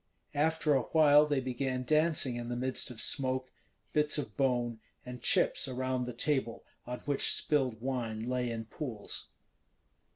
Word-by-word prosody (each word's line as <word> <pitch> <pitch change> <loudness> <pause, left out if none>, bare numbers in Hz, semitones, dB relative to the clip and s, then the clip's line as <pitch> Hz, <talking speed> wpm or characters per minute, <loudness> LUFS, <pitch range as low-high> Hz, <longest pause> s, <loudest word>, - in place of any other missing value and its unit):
After 155 +1 +2
a 135 - +3
while 150 +1 +5
they 145 -2 +1
began 130 0 -2
dancing 155 -2 +2
in 120 0 -5
the 120 - -2
midst 130 +2 -1
of 120 -3 -9
smoke, 130 +1 +1 0.4
bits 150 0 +3
of 145 - -4
bone, 120 -4 0 0.3
and 125 -1 -8
chips - - +2
around 130 -1 -2
the 125 - -4
table 125 -2 -1 0.2
on 125 0 -5
which 145 -1 +1
spilled 130 -7 0
wine 120 -4 -3
lay 125 -1 -1
in 115 -1 -4
pools. 115 -4 -6
130 Hz, 155 wpm, -31 LUFS, 120-145 Hz, 0.4 s, while